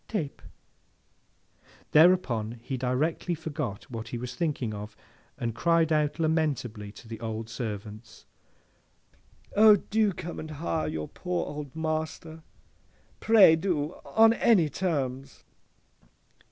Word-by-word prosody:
—Tape!' 160 Hz, -11 st, -4 dB, 1.5 s
Thereupon 130 Hz, -10 st, +3 dB
he 130 Hz, -, -4 dB
directly 135 Hz, +7 st, -1 dB
forgot 150 Hz, -, -5 dB
what 115 Hz, -1 st, -6 dB
he 120 Hz, -, -5 dB
was 125 Hz, +1 st, -6 dB
thinking 135 Hz, -6 st, -2 dB
of, 105 Hz, +1 st, -8 dB, 0.4 s
and 115 Hz, -2 st, -3 dB
cried 165 Hz, +5 st, +2 dB
out 150 Hz, -1 st, +1 dB
lamentably 145 Hz, -10 st, -1 dB
to 115 Hz, -, -14 dB
the 115 Hz, -1 st, -7 dB
old 110 Hz, 0 st, -5 dB
servants, 110 Hz, -1 st, -7 dB, 1.3 s
'O, 215 Hz, 0 st, +8 dB
do 210 Hz, +1 st, +1 dB
come 175 Hz, -1 st, -7 dB
and 155 Hz, -, -7 dB
hire 155 Hz, +1 st, -2 dB
your 75 Hz, -1 st, -4 dB
poor 180 Hz, -1 st, -3 dB
old 145 Hz, -1 st, -7 dB
master! 160 Hz, 0 st, -4 dB, 0.8 s
Pray 215 Hz, -7 st, +7 dB
do! 160 Hz, -2 st, -1 dB
On 225 Hz, 0 st, +5 dB
any 200 Hz, -9 st, +3 dB
terms! 135 Hz, -7 st, -3 dB
150 Hz, 115 wpm, -28 LUFS, 115-170 Hz, 1.5 s, O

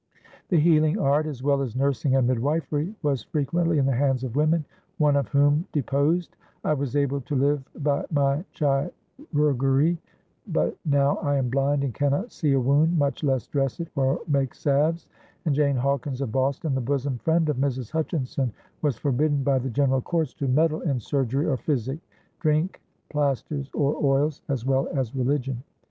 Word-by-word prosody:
The 175 Hz, -, +3 dB
healing 155 Hz, +2 st, +4 dB
art, 150 Hz, -4 st, +2 dB
as 135 Hz, -4 st, -6 dB
well 140 Hz, 0 st, +2 dB
as 125 Hz, -4 st, -4 dB
nursing 135 Hz, 0 st, +1 dB
and 130 Hz, -2 st, +3 dB
midwifery, 150 Hz, -, -1 dB
was 140 Hz, -5 st, +1 dB
frequently 165 Hz, +6 st, 0 dB
in 140 Hz, -, +3 dB
the 135 Hz, -, +2 dB
hands 135 Hz, 0 st, +1 dB
of 125 Hz, -2 st, -4 dB
women, 155 Hz, +1 st, +2 dB, 0.3 s
one 150 Hz, -2 st, +3 dB
of 140 Hz, -3 st, +1 dB
whom 145 Hz, +4 st, +3 dB
deposed: 150 Hz, +4 st, 0 dB, 0.3 s
"I -, -, +2 dB
was 140 Hz, -2 st, -3 dB
able 140 Hz, -1 st, +1 dB
to 145 Hz, -, -4 dB
live 140 Hz, +1 st, +2 dB, 0.2 s
by 145 Hz, -1 st, +1 dB
my 140 Hz, 0 st, +1 dB
chirurgery, 145 Hz, -, 0 dB, 0.5 s
but -, -, 0 dB
now 140 Hz, -1 st, +2 dB
I 145 Hz, 0 st, 0 dB
am 130 Hz, -3 st, 0 dB
blind 140 Hz, +1 st, +1 dB
and 135 Hz, -4 st, -2 dB
cannot 145 Hz, -, 0 dB
see 150 Hz, -4 st, 0 dB
a 135 Hz, -, +3 dB
wound, 145 Hz, +6 st, +3 dB
much 145 Hz, +1 st, 0 dB
less 135 Hz, -4 st, +1 dB
dress 135 Hz, -1 st, -1 dB
it 170 Hz, -1 st, -4 dB
or 135 Hz, -1 st, +1 dB
make 140 Hz, -4 st, 0 dB
salves"; 150 Hz, +4 st, +1 dB, 0.4 s
and 155 Hz, -, +2 dB
Jane 140 Hz, -1 st, +2 dB
Hawkins 135 Hz, 0 st, -1 dB
of 130 Hz, -5 st, -2 dB
Boston, 135 Hz, +5 st, 0 dB
the 130 Hz, -, 0 dB
"bosom 135 Hz, 0 st, -1 dB
friend" 160 Hz, +2 st, +2 dB
of 150 Hz, -4 st, 0 dB
Mrs. 130 Hz, -3 st, -2 dB
Hutchinson, 150 Hz, -5 st, -1 dB, 0.3 s
was 145 Hz, -5 st, 0 dB
forbidden 145 Hz, +1 st, +1 dB
by 135 Hz, -1 st, +2 dB
the 130 Hz, +1 st, -3 dB
general 135 Hz, +1 st, +1 dB
courts 160 Hz, -1 st, -1 dB
"to 140 Hz, -4 st, -3 dB
meddle 155 Hz, +4 st, +2 dB
in 140 Hz, -7 st, 0 dB
surgery 135 Hz, +3 st, -1 dB
or 135 Hz, -, +1 dB
physic, 135 Hz, +1 st, -2 dB, 0.4 s
drink, 155 Hz, +3 st, 0 dB, 0.3 s
plaisters 140 Hz, -1 st, -1 dB
or 145 Hz, 0 st, +1 dB
oils," 140 Hz, +1 st, +2 dB
as 130 Hz, -4 st, -2 dB
well 135 Hz, 0 st, +1 dB
as 130 Hz, -3 st, -2 dB
religion. 130 Hz, -1 st, -1 dB
140 Hz, 175 wpm, -25 LUFS, 135-150 Hz, 0.5 s, healing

